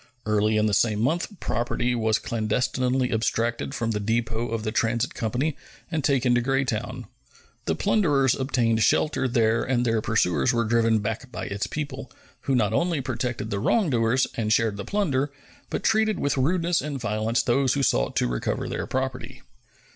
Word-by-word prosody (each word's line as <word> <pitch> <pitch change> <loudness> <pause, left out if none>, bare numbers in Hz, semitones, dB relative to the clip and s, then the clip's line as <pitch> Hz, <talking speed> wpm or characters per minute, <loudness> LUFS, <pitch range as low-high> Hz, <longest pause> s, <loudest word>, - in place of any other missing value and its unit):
Early 110 0 +2
in 105 - +2
the 105 - +1
same 105 0 +2
month 155 +10 +1
property 120 +1 -1
was 110 -2 +1
clandestinely 125 +3 0
abstracted 115 +4 -1
from 115 -3 -1
the 105 - -1
depot 115 +2 -1
of 115 -1 -3
the 110 - -2
Transit 115 +2 0
Company 125 +7 -1 0.4
and 155 -4 -1
taken 130 -3 +2
to 120 - +3
Greytown. 135 -3 -1 0.6
The 80 - 0
plunderers 140 - +2
obtained 120 -4 +1
shelter 130 +3 +2
there 115 -2 +2
and 125 -2 0
their 115 -2 +1
pursuers 90 -11 +1
were 115 -1 +2
driven 115 0 +3
back 110 +4 -4
by - - -5
its 100 0 -3
people, 140 -3 -5 0.3
who 135 - +2
not 110 -3 +1
only 170 +4 +1
protected 120 -3 -3
the 100 - -1
wrongdoers 130 - +2
and 110 -2 -1
shared 110 -2 +2
the 100 - -5
plunder, 145 -9 0 0.4
but - - -3
treated 220 -1 +2
with 140 - 0
rudeness 170 +5 +1
and 145 -2 -4
violence 110 +1 0
those 130 +1 +2
who 140 - 0
sought - - +1
to - - +2
recover - - -2
their - - -4
property. 130 -1 -4
120 Hz, 170 wpm, -25 LUFS, 110-135 Hz, 0.6 s, to